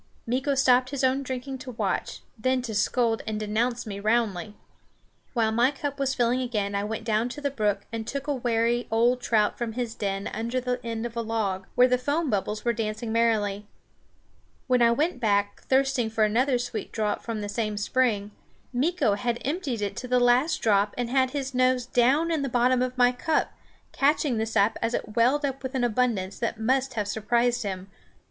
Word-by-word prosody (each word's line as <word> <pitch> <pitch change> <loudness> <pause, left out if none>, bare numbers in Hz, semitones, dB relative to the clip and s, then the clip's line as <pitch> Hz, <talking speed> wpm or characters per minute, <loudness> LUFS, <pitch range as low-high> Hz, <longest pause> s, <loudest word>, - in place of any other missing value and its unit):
Meeko 265 +4 0
stopped 255 -1 +4
his 275 -1 -3
own 260 +1 +2
drinking 260 0 -5
to 255 - -8
watch, - - -2
then 255 +2 0
to 230 -3 -4
scold 225 +2 +1
and 215 -1 -2
denounce 235 +3 -1
me 200 -2 -5
roundly. 215 -2 0 0.8
While 225 -3 +2
my 235 +3 +3
cup 285 0 -5
was 270 -1 0
filling 245 +1 +1
again 210 -5 -2
I 200 0 0
went 220 +1 -4
down 225 +1 0
to 255 - -7
the 285 -1 -2
brook 210 -6 0
and 225 -1 -4
took 280 0 -4
a 295 - 0
wary 240 -1 0
old 240 +3 +2
trout 215 -4 +1
from 235 -2 -2
his 240 -1 -3
den 195 -2 -3
under 235 +3 -2
the 250 0 -3
end 230 0 -3
of 240 -1 -6
a 235 - -1
log, 210 -4 -2
where 250 +1 +6
the 250 0 +2
foam 290 +3 0
bubbles 210 +2 -2
were 235 - +2
dancing 220 0 -3
merrily. 210 -3 +1 1.0
When 250 -2 +2
I 235 - +6
went 290 +4 0
back, 205 -3 +1
thirsting 265 -3 +2
for 220 0 +1
another 245 +5 +2
sweet 240 -3 -5
draught 210 -2 -1
from 225 -2 -4
the 205 - -4
same 215 0 -2
spring, 210 -2 0 0.4
Meeko 280 - +1
had 240 +2 -1
emptied 275 - -2
it 200 -1 -3
to 250 - -5
the 250 0 +3
last 245 +6 +3
drop 205 -1 +2
and 245 -1 -2
had 260 -1 +3
his 270 0 -4
nose 255 -1 +2
down 265 +7 +2
in 320 -3 0
the 275 - -2
bottom 250 +1 +2
of 255 0 -2
my 245 0 +5
cup, 310 +6 -1 0.4
catching 280 -3 +2
the 220 - -1
sap 215 -1 +1
as 230 +1 0
it 215 - -5
welled 260 +6 +3
up 270 -1 -3
with 260 0 -5
an 255 - 0
abundance 225 -5 0
that 230 -1 -2
must 260 +3 0
have 210 -2 -1
surprised 235 +3 +1
him. 190 -3 -4
240 Hz, 200 wpm, -26 LUFS, 215-255 Hz, 1.0 s, where